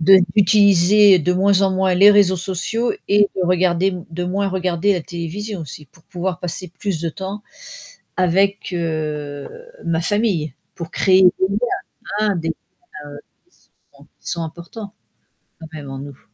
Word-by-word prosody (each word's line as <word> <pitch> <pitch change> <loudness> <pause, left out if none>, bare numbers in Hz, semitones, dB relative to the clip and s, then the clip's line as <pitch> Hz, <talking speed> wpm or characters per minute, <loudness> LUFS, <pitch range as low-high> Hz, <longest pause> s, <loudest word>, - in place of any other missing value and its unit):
de 190 +4 +7 0.2
d'utiliser 200 -1 +5
de 180 +4 +1
moins 195 +1 +3
en 190 - +3
moins 190 -1 +1
les 200 +3 +7
réseaux 200 -2 +4
sociaux 195 +6 -2 0.2
et 205 0 +4
de 185 -2 0
regarder 180 +1 +1 0.2
de 175 +2 -4
moins 195 +2 -1
regarder 185 +1 0
la 180 - -2
télévision 180 +4 -6
aussi 150 +1 -10
pour 160 +4 -25
pouvoir 180 -1 -4
passer 180 +1 -5
plus 195 -6 -3
de 165 - -2
temps 195 +4 -7 0.7
avec, 190 +2 +1
heu, 150 -4 -4 0.4
ma 165 -1 0
famille, 190 - 0 0.2
pour 170 -2 -7
créer 190 -1 +3
des 185 +1 +4
liens. 200 +1 -1 0.6
Hein, 210 -2 +1
des 165 0 -3
liens - - -1 1.0
qui - - -32 0.4
sont - - -19 0.2
qui - - -10
sont 170 -1 -2
importants 175 +6 -9 0.7
quand 160 - -10
même 145 -3 -8
en 135 - -6
nous. 140 -1 -10
185 Hz, 160 wpm, -19 LUFS, 165-200 Hz, 1.0 s, de